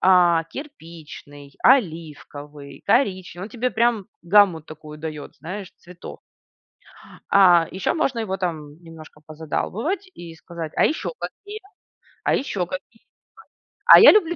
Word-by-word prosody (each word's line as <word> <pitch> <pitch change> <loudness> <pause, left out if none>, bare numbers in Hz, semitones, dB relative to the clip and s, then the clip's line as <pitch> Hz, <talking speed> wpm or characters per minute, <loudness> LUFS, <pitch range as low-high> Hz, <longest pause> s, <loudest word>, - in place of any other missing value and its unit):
а, 175 -3 +4
кирпичный, 160 - -12
оливковый, 150 - -1
коричневый. 185 -6 0
Он - - -12
тебе 245 +2 -2
прям 225 -2 +1 0.2
гамму 180 -2 +4
такую 155 0 -12
дает, 150 -1 -8
знаешь, 185 +6 -8
цветов. 180 -1 -12 1.1
А, 175 -4 +5
еще 190 0 -2
можно 265 -7 -1
его, 190 -4 -3
там, 160 -4 -5
немножко 160 -2 -14
позадалбывать 200 - -4
и 170 -1 -10
сказать: 165 -1 -8
"А - - +4
еще 315 - -3
какие? 415 +2 -8 0.6
А - - +2
еще 200 -9 -2
какие? 185 +5 -10 0.8
А - - +10
я - - +10
люблю 345 -5 +2
175 Hz, 125 wpm, -22 LUFS, 155-220 Hz, 1.1 s, А